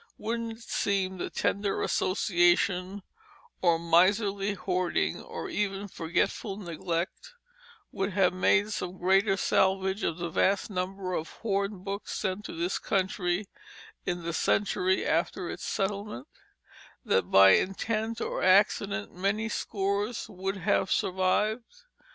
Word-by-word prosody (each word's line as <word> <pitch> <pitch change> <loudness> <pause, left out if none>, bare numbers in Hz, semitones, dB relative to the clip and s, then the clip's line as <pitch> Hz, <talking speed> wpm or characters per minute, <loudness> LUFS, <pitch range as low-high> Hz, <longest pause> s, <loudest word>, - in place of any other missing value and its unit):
Wouldn't 230 +1 -3
it 225 +1 -14
seem 190 -4 -1
that - - -5
tender 200 0 0
association, 185 +1 +1 0.6
or 170 -2 +4
miserly 195 +4 +2
hoarding, 185 -2 -1
or - - -6
even 205 - -2
forgetful 185 +3 -2
neglect 175 - -4 0.6
would 195 0 -2
have 185 -2 +3
made 205 +3 +2
some 180 -2 -4
greater 195 +2 +3
salvage 190 +1 +1
from 165 - -1
the 170 -1 -4
vast 195 +5 +1
number 185 0 -3
of 160 -1 -3
hornbooks 200 -1 -2
sent 195 +1 -3
to - - -6
this 170 +3 -1
country 190 0 -1 0.6
in 175 -1 -3
the 170 0 -3
century 190 +1 +1
after 170 +2 0
its - - -7
settlement; 195 - -3 0.8
that 95 -1 +1
by 95 0 +8
intent 220 - 0
or - - -2
accident 200 +2 +3
many 200 +5 -1
scores 205 +2 -2
would 195 -1 -4
have 185 +1 +1
survived? 215 - 0
195 Hz, 120 wpm, -28 LUFS, 180-205 Hz, 0.8 s, by